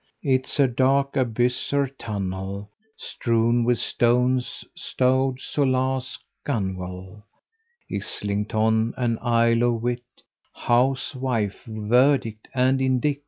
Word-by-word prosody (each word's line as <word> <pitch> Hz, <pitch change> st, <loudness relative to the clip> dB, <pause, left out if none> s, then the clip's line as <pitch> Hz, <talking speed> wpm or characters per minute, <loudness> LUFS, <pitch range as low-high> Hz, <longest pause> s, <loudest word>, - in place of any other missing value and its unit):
It's 130 Hz, 0 st, 0 dB
a 140 Hz, -, +6 dB
dark 135 Hz, +3 st, +1 dB
abyss 125 Hz, -1 st, 0 dB
or 140 Hz, 0 st, +3 dB
tunnel, 100 Hz, -5 st, -5 dB, 0.3 s
Strewn 115 Hz, 0 st, +1 dB
with 120 Hz, 0 st, +2 dB
stones, 125 Hz, +1 st, +1 dB
like -, -, -8 dB
rowlock, 130 Hz, 0 st, +1 dB, 0.4 s
gunwale, 95 Hz, -4 st, -4 dB, 0.6 s
Islington 110 Hz, +2 st, -1 dB
and 115 Hz, -3 st, 0 dB
Isle 115 Hz, -1 st, +3 dB
of 120 Hz, -2 st, +1 dB
Wight, 120 Hz, 0 st, -1 dB, 0.5 s
Housewife, 125 Hz, -3 st, 0 dB
verdict 110 Hz, +1 st, +1 dB
and 130 Hz, +1 st, +2 dB
indict! 130 Hz, +2 st, +1 dB
120 Hz, 95 wpm, -24 LUFS, 110-130 Hz, 0.6 s, a